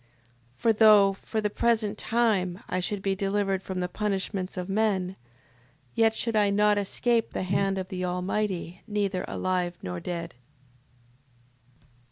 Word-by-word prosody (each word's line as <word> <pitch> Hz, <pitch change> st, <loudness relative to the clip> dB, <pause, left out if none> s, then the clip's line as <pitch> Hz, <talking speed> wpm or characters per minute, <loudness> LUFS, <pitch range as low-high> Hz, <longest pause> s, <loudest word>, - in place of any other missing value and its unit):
6:26. -, -, -35 dB
For 230 Hz, -, +4 dB
though, 210 Hz, -2 st, +6 dB
for 220 Hz, +3 st, -4 dB
the 210 Hz, -, 0 dB
present 220 Hz, -2 st, +1 dB
time, 205 Hz, -6 st, 0 dB
I 185 Hz, -, -1 dB
should 195 Hz, +2 st, -3 dB
be 195 Hz, -, +1 dB
delivered 195 Hz, 0 st, 0 dB
from 185 Hz, -1 st, -4 dB
the 180 Hz, -, 0 dB
punishments 195 Hz, -1 st, -3 dB
of 180 Hz, 0 st, -3 dB
men, 195 Hz, -3 st, 0 dB, 0.8 s
yet 225 Hz, -1 st, +3 dB
should 230 Hz, 0 st, -1 dB
I 205 Hz, -1 st, +4 dB
not 205 Hz, +1 st, +3 dB
escape 230 Hz, +3 st, 0 dB
the -, -, -2 dB
hand 195 Hz, +1 st, 0 dB
of 185 Hz, -1 st, -4 dB
the 185 Hz, -1 st, -4 dB
Almighty 180 Hz, 0 st, -2 dB
neither 200 Hz, -3 st, -1 dB
alive 180 Hz, -1 st, -1 dB
nor 90 Hz, -1 st, -4 dB
dead. 170 Hz, -, -5 dB
195 Hz, 150 wpm, -27 LUFS, 185-210 Hz, 0.8 s, though